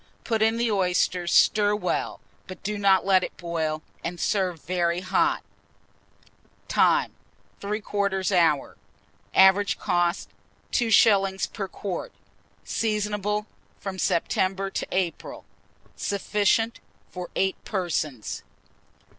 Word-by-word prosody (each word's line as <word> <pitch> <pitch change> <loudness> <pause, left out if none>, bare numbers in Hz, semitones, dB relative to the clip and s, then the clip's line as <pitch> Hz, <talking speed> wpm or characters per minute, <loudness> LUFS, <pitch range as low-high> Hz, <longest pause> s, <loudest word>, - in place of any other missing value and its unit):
Put 225 -2 -1
in 225 +1 +3
the 235 -1 +1
oysters, 180 -2 +1
stir 210 -1 +4
well, 210 - -2 0.3
but 185 - -10
do 210 +1 -3
not 195 -2 +4
let 190 -1 +4
it - - -6
boil, 160 -3 -3 0.2
and 175 +1 -4
serve 185 -6 -1
very 175 0 0
hot. 330 - +1 1.2
Time. - - +3 0.5
3/4 200 -2 -1
hour. 165 -6 +2 0.6
Average 190 +1 +5
cost, 175 -2 0 0.4
2s. 200 -4 +3
per 195 -3 -4
quart. 200 - -5 0.5
Seasonable 210 -1 -1 0.3
from 190 -1 -6
September 190 +3 0
to - - -3
April. 185 -2 -3 0.5
Sufficient 210 +3 0 0.3
for 180 -1 -6
8 190 0 0
persons. 160 - -3
195 Hz, 105 wpm, -25 LUFS, 180-210 Hz, 1.2 s, Average